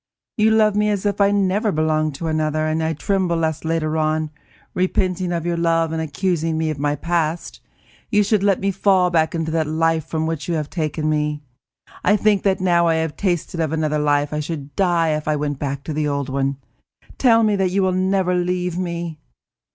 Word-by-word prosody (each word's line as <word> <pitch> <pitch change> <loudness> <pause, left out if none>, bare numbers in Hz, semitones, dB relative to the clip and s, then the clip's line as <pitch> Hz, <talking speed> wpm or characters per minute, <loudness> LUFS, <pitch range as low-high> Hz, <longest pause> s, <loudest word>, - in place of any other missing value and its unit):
You 215 -1 +3
love 215 -2 +3
me 210 0 +2
as 205 -1 -1
if 205 0 0
I 200 - +6
had 205 - +1
never 200 +2 +1
belonged 155 -2 0
to 165 - -6
another, 155 0 0
and 155 +1 0
I 160 0 0
tremble 185 +2 0
lest 160 -1 -1
later 160 -1 -1
on, 155 0 0 0.4
repenting 185 0 0
of 170 -1 -2
your 170 -1 -1
love, 165 -1 +1
and 160 0 -2
accusing 160 +1 -1
me 160 -1 0
of 145 - -6
my 145 0 0
past, 165 +1 -2 0.5
you 210 -1 +3
should 210 0 +1
let 200 -1 +2
me 195 +1 0
fall 190 -2 +2
back 160 -1 +1
into 160 -1 -2
that 160 -1 0
life 160 0 0
from 160 -1 -2
which 160 -2 -3
you 170 - 0
have 150 -2 -3
taken 155 -2 -2
me. 150 -1 -1 0.6
I 205 - +4
think 210 -1 +2
that 195 -1 +1
now 175 -2 +3
that 165 - +3
I - - +1
have 160 -1 -2
tasted 175 -3 -2
of 160 -2 0
another 155 -1 0
life, 145 0 +1
I 150 - -1
should 145 -3 -6
die 175 -4 +2
if 155 0 -2
I 155 - +2
went 145 -2 -3
back 140 -1 -3
to 155 - -5
the 150 0 -1
old 140 -1 -2
one. 135 0 -1 0.6
Tell 230 -3 +5
me 210 -1 +3
that 190 -1 +1
you 195 +2 +1
will 185 - +2
never 185 0 +1
leave 180 0 -1
me!" 170 -3 -4
165 Hz, 220 wpm, -21 LUFS, 155-185 Hz, 0.6 s, I